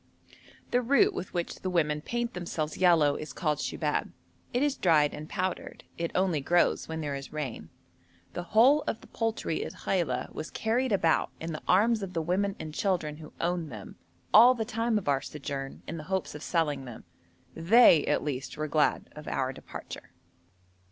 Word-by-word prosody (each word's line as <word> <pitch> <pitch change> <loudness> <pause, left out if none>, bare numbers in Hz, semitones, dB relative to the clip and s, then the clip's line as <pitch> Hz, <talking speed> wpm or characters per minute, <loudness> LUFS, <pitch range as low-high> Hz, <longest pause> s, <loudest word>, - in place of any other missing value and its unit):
The 245 - +3
root 280 - +4
with 190 - -5
which 175 -1 -3
the 185 - -4
women 150 -4 +1
paint 240 +6 -3
themselves 165 -3 -3
yellow 165 -6 +4
is 155 - -7
called 150 -4 -1
shubab. - - -1 0.4
It 245 +3 +1
is 290 -1 +1
dried 155 -5 +3
and 155 +2 -8
powdered. 185 -2 -3
It 170 0 -2
only 180 -5 +1
grows 175 +5 +2
when 160 0 -4
there 145 -2 -3
is 140 0 -6
rain. 150 -6 -5 0.6
The - - -3
whole 235 - +5
of 225 - -2
the - - -14
poultry 225 -8 -2
at - - -6
Khaila 170 -10 -2
was 155 - -6
carried 240 +3 0
about 165 -5 +2
in 165 +1 -4
the 155 - -6
arms 215 +4 +4
of 190 -2 -5
the 165 - 0
women 195 +4 0
and 155 -1 -6
children 160 -5 -1
who 155 -1 -11
owned 170 -2 -1
them, 105 -4 -9 0.4
all 240 +4 +8
the 225 -2 -2
time 230 -1 0
of 200 - -4
our 140 -1 +2
sojourn, 140 -2 -6
in 165 - -5
the 155 - -8
hopes 190 -1 -1
of 150 - -8
selling 150 -5 -1
them. 120 -3 -9 0.5
They, 170 -2 +6
at - - +1
least, 135 -1 -4
were 155 0 -2
glad 150 0 +1
of 150 0 -10
our 130 0 -1
departure. - - -9
170 Hz, 185 wpm, -29 LUFS, 150-205 Hz, 0.6 s, all